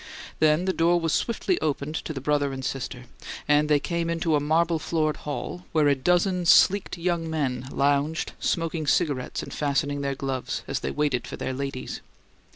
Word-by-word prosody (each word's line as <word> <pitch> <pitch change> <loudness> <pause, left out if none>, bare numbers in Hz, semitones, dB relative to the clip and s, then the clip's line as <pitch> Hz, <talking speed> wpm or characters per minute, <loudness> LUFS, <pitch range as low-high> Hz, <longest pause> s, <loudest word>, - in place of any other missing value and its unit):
Then 155 +3 +3
the 190 - +1
door 170 +1 +3
was 165 -2 0
swiftly 290 - 0
opened 150 0 -1
to 160 - -4
the 140 - -4
brother 145 0 +1
and 130 -1 -5
sister; 125 -2 -4 0.4
and 150 0 +3
they 150 -1 +5
came 170 +2 -2
into 165 -1 +1
a - - +3
marble 160 +3 +2
floored 155 -1 0
hall, 165 +4 -5
where 155 -2 +4
a 145 - +5
dozen 180 +5 +1
sleeked 195 +1 +5
young 170 -1 -1
men 130 -5 -2
lounged, 145 +3 +1
smoked 165 -3 -1
cigarettes 140 -5 0
and - - -8
fastened 145 0 -1
their 140 0 -1
gloves, 135 -1 -3
as - - -1
they - - -3
waited 145 -5 0
for - - -6
their 130 - -3
ladies. 135 -1 -5
150 Hz, 180 wpm, -26 LUFS, 140-165 Hz, 0.4 s, they